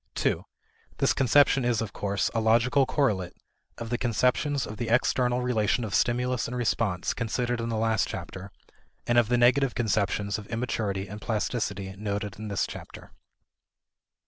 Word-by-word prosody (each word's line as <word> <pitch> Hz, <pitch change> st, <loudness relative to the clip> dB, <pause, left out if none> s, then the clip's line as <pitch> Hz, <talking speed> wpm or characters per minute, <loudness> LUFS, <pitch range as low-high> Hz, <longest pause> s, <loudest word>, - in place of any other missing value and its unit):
2 -, -, 0 dB, 0.5 s
This -, -, +2 dB
conception 135 Hz, +1 st, +4 dB
is, 120 Hz, -2 st, +1 dB
of 110 Hz, -3 st, -4 dB
course, 100 Hz, 0 st, -1 dB
a 115 Hz, -, 0 dB
logical 120 Hz, +5 st, +3 dB
correlate 100 Hz, -, 0 dB, 0.4 s
of 115 Hz, 0 st, -6 dB
the 120 Hz, -, 0 dB
conceptions 125 Hz, +4 st, +1 dB
of 105 Hz, -, -8 dB
the 120 Hz, -, -3 dB
external 125 Hz, +1 st, +2 dB
relation 120 Hz, -1 st, +1 dB
of 110 Hz, -, -4 dB
stimulus 125 Hz, 0 st, +1 dB
and 125 Hz, +1 st, -4 dB
response, 110 Hz, -6 st, 0 dB
considered 120 Hz, +1 st, -2 dB
in 115 Hz, -, -3 dB
the 115 Hz, -, -1 dB
last 110 Hz, -2 st, +1 dB
chapter, 95 Hz, +1 st, -7 dB, 0.5 s
and 120 Hz, 0 st, +4 dB
of 120 Hz, -, +2 dB
the 120 Hz, +1 st, +2 dB
negative 130 Hz, +2 st, +3 dB
conceptions 105 Hz, -2 st, 0 dB
of 105 Hz, -, -11 dB
immaturity 110 Hz, -4 st, -2 dB
and 105 Hz, +2 st, -8 dB
plasticity 105 Hz, -4 st, -2 dB
noted 105 Hz, -1 st, -4 dB
in 110 Hz, -, -5 dB
this 100 Hz, -1 st, 0 dB
chapter. -, -, -10 dB
115 Hz, 160 wpm, -27 LUFS, 105-125 Hz, 0.5 s, conception